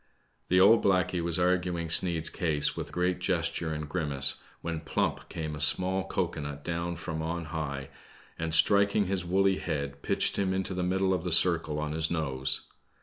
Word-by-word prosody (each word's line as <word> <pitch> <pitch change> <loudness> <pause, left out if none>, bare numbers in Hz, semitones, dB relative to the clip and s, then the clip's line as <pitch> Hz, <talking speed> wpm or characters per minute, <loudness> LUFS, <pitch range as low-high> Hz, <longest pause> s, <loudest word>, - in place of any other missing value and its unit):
The 90 - +3
old 105 +5 +6
blackey 90 -2 +1
was 85 -1 -1
arguing 90 -1 0
Sneid's 80 -1 +3
case 80 -6 0
with - - -6
great 90 0 -1
gesture 85 -2 -1
and 75 -1 -4
grimace, 70 -5 +2 0.2
when 85 -1 -4
plump 80 - -2
came 80 -2 -5
a - - -8
small 95 +5 +2
cocoa 90 -5 -2
nut 70 0 -7
down 85 0 -3
from 80 -2 -5
on 85 +1 -3
high, 70 -3 -5 0.5
and 80 0 -2
striking 100 +4 +4
his 95 -1 -1
woolly 95 +2 +2
head 70 -3 -4
pitched - - +1
him 95 -1 0
into 95 0 -2
the 90 - -3
middle 95 +1 +1
of 90 -3 -2
the 90 - -2
circle 85 -3 +2
on 75 0 -3
his 80 +1 -1
nose. 65 -6 -1
85 Hz, 180 wpm, -28 LUFS, 80-90 Hz, 0.5 s, old